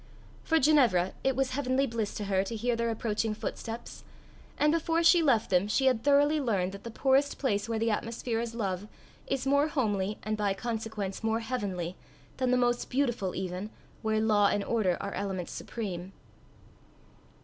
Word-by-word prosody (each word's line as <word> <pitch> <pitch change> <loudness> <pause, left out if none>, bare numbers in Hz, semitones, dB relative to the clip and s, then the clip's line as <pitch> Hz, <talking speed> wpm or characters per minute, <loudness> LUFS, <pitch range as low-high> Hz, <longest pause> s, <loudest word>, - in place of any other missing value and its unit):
For 325 - +2
Ginevra, 250 - +4
it 265 -1 +2
was 270 0 0
heavenly 265 0 +1
bliss 225 -4 -3
to 210 - -3
her 195 -1 +1
to 225 - -4
hear 235 +2 0
their 235 0 0
approaching 220 -1 -1
footsteps; 230 +2 -6 0.5
and 300 0 +3
before 330 +1 +1
she 335 +1 +6
left 240 -10 +2
them 180 +2 +3
she 240 +6 +1
had 255 -4 +3
thoroughly 290 +2 +4
learned 195 -8 0
that 200 +1 -10
the 235 - -6
poorest 270 +4 +2
place 215 -5 -1
where 225 - 0
the 225 +1 +1
atmosphere 230 +1 -2
is 230 0 -4
love, 195 -3 -2 0.4
is 270 -1 -1
more 280 +2 +3
homely, 210 -8 -1
and 215 0 -1
by 205 -2 0
consequence 220 -3 -4
more 225 +1 +1
heavenly, 190 -8 -3 0.4
than 255 -1 0
the 250 - +3
most 240 -1 +1
beautiful 240 -8 0
even, 185 +2 -4 0.3
where 220 0 +1
law 210 -2 +4
and 200 0 0
order 200 -6 +1
are 200 - -4
elements 190 -3 -3
supreme. 190 -5 -5
225 Hz, 175 wpm, -29 LUFS, 200-260 Hz, 0.5 s, she